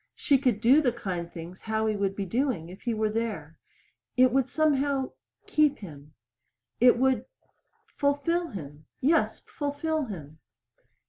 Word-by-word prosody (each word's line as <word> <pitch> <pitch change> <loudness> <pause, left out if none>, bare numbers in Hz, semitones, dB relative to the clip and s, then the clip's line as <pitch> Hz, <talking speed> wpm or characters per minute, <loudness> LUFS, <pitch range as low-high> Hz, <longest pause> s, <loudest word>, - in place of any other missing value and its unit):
She 280 -3 +3
could 245 -6 +1
do 260 +6 +6
the 255 -5 +2
kind 180 -7 -4
things 170 +2 -9
Howie 220 -1 0
would 195 -1 -1
be 200 - -3
doing 225 - -1
if 185 - -11
he 240 - -1
were 215 0 0
there! 210 -9 -4 0.6
It 255 0 +6
would 265 0 +1
somehow 280 -3 +1 0.3
keep 300 -2 +3
him. 150 -7 -12 0.6
It 245 0 +6
would 260 -2 +2 0.7
fulfill 290 +5 +1
him. 150 - -9
Yes, 320 +5 +2
fulfill 295 +1 -2
him. 160 - -9
235 Hz, 140 wpm, -27 LUFS, 190-280 Hz, 0.7 s, do